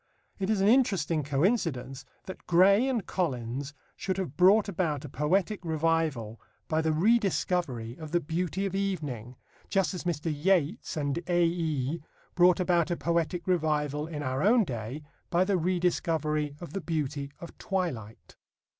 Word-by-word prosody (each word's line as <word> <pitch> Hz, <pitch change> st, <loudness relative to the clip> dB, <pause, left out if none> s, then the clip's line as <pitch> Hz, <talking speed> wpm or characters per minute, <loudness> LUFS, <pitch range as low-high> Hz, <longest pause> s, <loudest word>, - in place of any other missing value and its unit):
It 195 Hz, 0 st, -1 dB
is 215 Hz, -3 st, +2 dB
an 195 Hz, -, +4 dB
interesting 195 Hz, -, +3 dB
coincidence 140 Hz, -, -1 dB, 0.2 s
that 185 Hz, -, -9 dB
Gray 195 Hz, +7 st, +5 dB
and 235 Hz, -7 st, -1 dB
Collins 135 Hz, -4 st, -3 dB, 0.2 s
should 190 Hz, -1 st, -3 dB
have 180 Hz, -7 st, -4 dB
brought 200 Hz, +5 st, +5 dB
about 165 Hz, -7 st, -2 dB
a -, -, -7 dB
poetic 185 Hz, -, 0 dB
revival 160 Hz, -8 st, -1 dB, 0.3 s
by 160 Hz, 0 st, +1 dB
the 160 Hz, 0 st, +1 dB
rediscovery 175 Hz, -, +1 dB
of 155 Hz, -2 st, -8 dB
the 175 Hz, +2 st, +2 dB
beauty 175 Hz, +4 st, -2 dB
of 195 Hz, -, -3 dB
evening, 150 Hz, -, -3 dB, 0.3 s
just 195 Hz, -1 st, +1 dB
as 180 Hz, -, -5 dB
Mr. 165 Hz, -2 st, -1 dB
Yeats 175 Hz, +2 st, 0 dB
and 145 Hz, +1 st, -1 dB
"A.E." 165 Hz, -4 st, 0 dB, 0.3 s
brought 180 Hz, +1 st, +5 dB
about 175 Hz, -2 st, +2 dB
a 175 Hz, -, -1 dB
poetic 170 Hz, +1 st, -1 dB
revival 150 Hz, -4 st, 0 dB
in 150 Hz, -3 st, -5 dB
our 130 Hz, 0 st, -1 dB
own 225 Hz, +5 st, +5 dB
day 125 Hz, -, -5 dB, 0.3 s
by 175 Hz, +1 st, +3 dB
the 195 Hz, +1 st, +1 dB
rediscovery 160 Hz, -4 st, 0 dB
of 175 Hz, -, -9 dB
the 195 Hz, -, -3 dB
beauty 150 Hz, -4 st, -2 dB
of 170 Hz, -, -10 dB
twilight. 145 Hz, -, -4 dB
165 Hz, 150 wpm, -28 LUFS, 145-185 Hz, 0.3 s, Gray